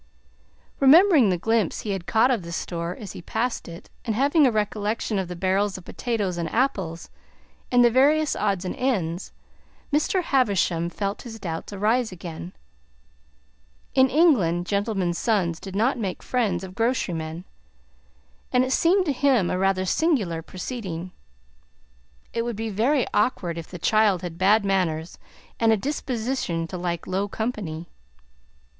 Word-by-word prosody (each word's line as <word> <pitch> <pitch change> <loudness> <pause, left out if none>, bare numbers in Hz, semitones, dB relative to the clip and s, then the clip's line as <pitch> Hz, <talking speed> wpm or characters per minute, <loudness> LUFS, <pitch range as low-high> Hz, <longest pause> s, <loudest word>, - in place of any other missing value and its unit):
Remembering 295 - +6
the 180 - +1
glimpse 225 0 0
he 210 - -3
had 190 -3 -4
caught 225 +8 +4
of 235 -6 +1
the 170 0 -8
store 170 0 -4
as 205 -4 -7
he - - -9
passed 230 +7 -2
it, 170 0 -11
and 225 -3 -2
having 285 +4 +4
a - - +2
recollection 210 0 -1
of 190 - -2
the 180 - -6
barrels 190 +3 0
of 185 - -12
potatoes 205 -7 -2
and 165 -2 -3
apples 190 -10 -1 0.6
and 245 -1 +6
the 240 - +5
various 295 +5 +3
odds 195 -3 -1
and 180 - -3
ends, 190 -9 -1 0.6
Mr. 330 +5 +2
Havisham 195 - +1
felt 200 +3 -3
his 225 -2 -9
doubts 165 -2 -5
arise 220 +4 +1
again. 175 0 -8 1.4
In 260 0 +5
England, 220 - +3
gentlemen's 200 -3 -1
sons 185 -8 0
did 195 -1 -8
not 235 +5 +1
make 190 -5 -4
friends 210 -8 0
of 185 -1 -8
grocerymen, 175 -8 -2 1.1
and 250 0 +4
it 260 - -3
seemed 365 +6 +3
to 295 - +1
him 255 -8 +2
a 180 - -1
rather 190 -1 +1
singular 205 - +1
proceeding. 185 -2 -6 1.2
It 230 - 0
would 235 -1 -3
be 225 +1 -4
very 245 +7 +2
awkward 195 -6 +1
if 165 -1 -7
the 180 - -8
child 210 0 +2
had 170 -1 -6
bad 200 +2 +4
manners 175 -4 -1 0.4
and 225 -1 +4
a 220 - +4
disposition 245 - -2
to 185 - -5
like 170 -1 -3
low 195 +2 -1
company. 200 -7 -4
205 Hz, 155 wpm, -24 LUFS, 175-245 Hz, 1.4 s, Remembering